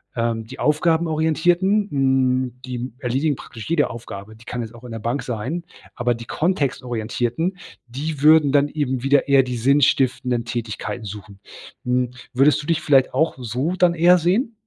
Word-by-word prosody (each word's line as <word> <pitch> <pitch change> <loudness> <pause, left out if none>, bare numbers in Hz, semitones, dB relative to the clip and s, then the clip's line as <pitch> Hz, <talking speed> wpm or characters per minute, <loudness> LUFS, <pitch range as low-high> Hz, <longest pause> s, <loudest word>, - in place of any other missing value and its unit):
Ähm, 115 -1 -1
die - - -10
aufgabenorientierten, 165 +5 +2
hm, 130 -2 +1
die 125 0 -5
erledigen 135 +3 0
praktisch 115 +2 -10
jede 160 -3 +2
Aufgabe, 110 -2 -9
die 110 +1 -18
kann 120 +1 -4
jetzt 115 0 -7
auch 120 +1 -14
in 120 - -9
der 115 - -5
Bank 120 +6 -2
sein, 130 +9 -4 0.3
aber 120 -1 0
die 115 0 -9
kontextorientierten, 130 - -1 0.3
die 140 +4 -5
würden 155 -2 +6
dann 145 0 +3
eben 130 -5 -2
wieder 140 +1 +3
eher 135 -1 +5
die 125 -1 -4
sinnstiftenden 130 -2 +2
Tätigkeiten 115 0 -4
suchen. 100 0 -9 0.5
Hm, 125 0 0 0.2
würdest 140 +3 +3
du - - -10
dich 165 -2 +1
vielleicht 135 -2 +3
auch 160 - +1
so 130 +8 -2
dann 175 -1 +4
eher 175 +2 +5
sehen? 200 - +1
130 Hz, 165 wpm, -21 LUFS, 120-155 Hz, 0.5 s, würden